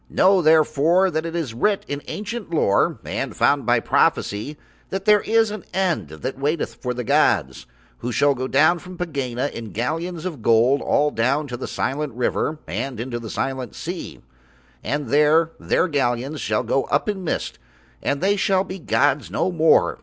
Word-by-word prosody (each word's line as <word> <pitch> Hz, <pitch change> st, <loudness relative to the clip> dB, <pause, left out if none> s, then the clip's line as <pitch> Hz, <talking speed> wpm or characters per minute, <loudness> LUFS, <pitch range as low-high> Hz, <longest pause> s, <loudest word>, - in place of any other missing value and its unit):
Know 190 Hz, 0 st, +4 dB
therefore 160 Hz, +3 st, +4 dB
that 160 Hz, +1 st, -2 dB
it 165 Hz, -, -6 dB
is 155 Hz, -9 st, -3 dB
writ 200 Hz, -, 0 dB
in 145 Hz, 0 st, -4 dB
ancient 215 Hz, 0 st, -5 dB
lore 125 Hz, -11 st, +2 dB
and -, -, -4 dB
found -, -, +2 dB
by -, -, +4 dB
prophecy 110 Hz, +9 st, 0 dB, 0.3 s
that 195 Hz, 0 st, -4 dB
there 210 Hz, -1 st, +5 dB
is 225 Hz, -1 st, +2 dB
an 210 Hz, -2 st, -6 dB
End 180 Hz, -, 0 dB
that 125 Hz, -, -6 dB
waiteth 150 Hz, +3 st, -1 dB
for 125 Hz, -1 st, -4 dB
the 125 Hz, -, -3 dB
gods, -, -, +1 dB, 0.3 s
who 125 Hz, -, -4 dB
shall 145 Hz, +4 st, +3 dB
go 130 Hz, 0 st, -4 dB
down 155 Hz, +6 st, +3 dB
from 180 Hz, +1 st, -11 dB
Pegāna 140 Hz, -6 st, -3 dB
in 115 Hz, -2 st, -7 dB
galleons 160 Hz, -, -3 dB
of 160 Hz, -10 st, -5 dB
gold 115 Hz, +5 st, +3 dB
all 150 Hz, 0 st, +2 dB
down 135 Hz, +6 st, +1 dB
the 125 Hz, -2 st, -6 dB
Silent 140 Hz, 0 st, -2 dB
River 125 Hz, +5 st, -1 dB
and 135 Hz, -4 st, -4 dB
into 120 Hz, 0 st, -4 dB
the 115 Hz, -2 st, -8 dB
Silent 130 Hz, -2 st, -3 dB
Sea, 175 Hz, +2 st, -6 dB, 0.6 s
and 140 Hz, +1 st, -2 dB
there 150 Hz, +4 st, +4 dB
Their 175 Hz, -, +1 dB
galleons 135 Hz, -1 st, -1 dB
shall 105 Hz, 0 st, 0 dB
go 135 Hz, -, 0 dB
up 140 Hz, -, 0 dB
in 200 Hz, -3 st, -2 dB
mist 165 Hz, -, -3 dB, 0.4 s
and 140 Hz, 0 st, -1 dB
They 200 Hz, +2 st, +3 dB
shall 190 Hz, -1 st, +2 dB
be 190 Hz, 0 st, -7 dB
gods 135 Hz, 0 st, +1 dB
no 185 Hz, -, 0 dB
more. 165 Hz, -2 st, +3 dB
150 Hz, 175 wpm, -22 LUFS, 125-175 Hz, 0.6 s, there